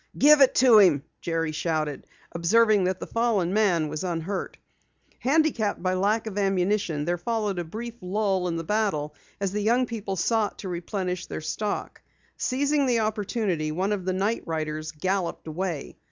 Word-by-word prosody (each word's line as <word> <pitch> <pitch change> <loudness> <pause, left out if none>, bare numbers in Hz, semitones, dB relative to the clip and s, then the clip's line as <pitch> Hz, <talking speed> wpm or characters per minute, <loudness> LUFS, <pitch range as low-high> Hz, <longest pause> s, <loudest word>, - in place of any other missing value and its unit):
"Give 295 0 +7
it 265 - +6
to 245 -4 +7
him!" 165 -9 +5 0.2
Jerry 165 -1 -1
shouted, 155 -2 -2 0.2
observing 205 +4 +3
that 185 0 -1
the - - -5
fallen 220 -6 0
man 185 -7 +2
was 150 +2 -4
unhurt. 175 +2 -3 0.6
Handicapped 265 - +1
by 185 0 +1
lack 205 +5 +1
of 205 -2 -4
ammunition, 195 -5 0
there 175 +1 -1
followed 210 -3 -1
a - - -1
brief 225 +8 -6
lull 190 -1 0
in 170 - -2
the 165 - -3
battle, 160 -7 -1 0.3
as 195 -2 -1
the 210 +1 -2
young 240 +4 +3
people 215 -5 -4
sought 215 +3 0
to 190 - -6
replenish 180 +1 -3
their - - -5
stock. 200 +7 -4 0.3
Seizing 280 +2 +1
the 235 -2 +2
opportunity, 210 -7 -1
one 185 +6 -1
of 195 -3 -2
the 185 - 0
night 200 +5 0
riders 155 -1 -3
galloped 185 +3 -2
away. 165 -2 -4
195 Hz, 170 wpm, -26 LUFS, 170-220 Hz, 0.6 s, Give